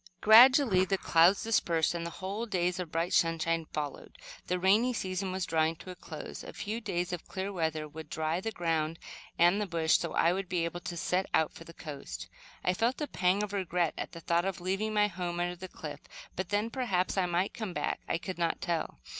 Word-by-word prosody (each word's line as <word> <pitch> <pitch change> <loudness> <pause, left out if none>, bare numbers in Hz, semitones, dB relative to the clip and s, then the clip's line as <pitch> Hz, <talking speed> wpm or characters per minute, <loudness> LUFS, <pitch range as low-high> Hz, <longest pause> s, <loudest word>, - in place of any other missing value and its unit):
Gradually 230 -2 +7
the 195 +1 0
clouds 175 +3 +4
dispersed, 170 -8 +2
and 170 -1 -3
whole 195 +6 -4
days 180 -3 0
of 175 -3 -5
bright 165 +2 -1
sunshine 165 -1 +1
followed. 150 -2 -5 0.3
The 180 - 0
rainy 210 +7 +3
season 190 -3 -2
was 185 -1 -2
drawing 160 0 +1
to 185 +3 -10
a - - -9
close. 155 -3 -8
A - - -9
few 220 +3 -4
days 180 -3 -2
of 175 - -6
clear 195 +1 -4
weather 160 -3 -1
would 155 0 -10
dry 160 +2 -1
the 225 - -3
ground 165 -4 -1 0.4
and 175 +5 +4
the 205 - -1
bush 165 -2 +2
so - - -3
I 170 +1 +3
would 190 -1 -3
be 175 -2 0
able 170 +1 -4
to 175 0 -6
set 185 +3 0
out 160 - +2
for 165 - -11
the 165 - -12
coast. 140 - -7 0.3
I 180 - +2
felt 230 +7 0
a 300 - -1
pang 190 -4 +1
of 205 -1 -5
regret 180 -4 0
at - - -5
the 165 - -8
thought 170 +1 +1
of 195 -2 -2
leaving 195 +4 -1
my 210 0 +5
home 180 -3 -3
under 175 0 -1
the 185 +2 -8
cliff; - - -8 0.4
but 185 -1 -3
then, 205 +3 0
perhaps 210 -9 0
I 190 -2 +2
might 175 +3 0
come 215 -5 -5
back. - - -1
I - - +1
could 180 +1 -6
not 170 -1 0
tell. 170 -2 -2
180 Hz, 220 wpm, -30 LUFS, 165-195 Hz, 0.4 s, Gradually